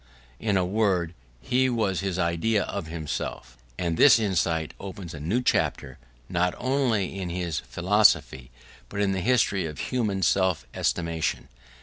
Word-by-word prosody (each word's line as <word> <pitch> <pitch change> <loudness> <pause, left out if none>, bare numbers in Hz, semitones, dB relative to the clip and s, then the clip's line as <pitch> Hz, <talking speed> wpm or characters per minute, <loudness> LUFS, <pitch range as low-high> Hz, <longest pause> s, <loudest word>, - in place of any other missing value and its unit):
In 105 -3 +1
a 90 - +1
word, 95 -4 0 0.3
he 130 - +2
was 105 -7 0
his 95 -2 -2
idea 90 +5 +1
of 100 -5 -5
himself: 80 -6 -5 0.2
and 85 -2 -1
this 145 - +8
insight 85 -7 0
opens 95 -3 -8
a 75 - -7
new 100 +12 -1
chapter - - 0 0.3
not 90 +1 0
only 120 -8 0
in 90 -2 -3
his 85 -2 -2
philosophy 85 - +2 0.4
but 100 - -5
in 100 -1 +2
the 95 -1 -1
history 105 -6 +2
of 75 - -8
human 105 -7 -1
self 95 0 +2
estimation. 85 -2 -1
95 Hz, 145 wpm, -26 LUFS, 85-105 Hz, 0.4 s, this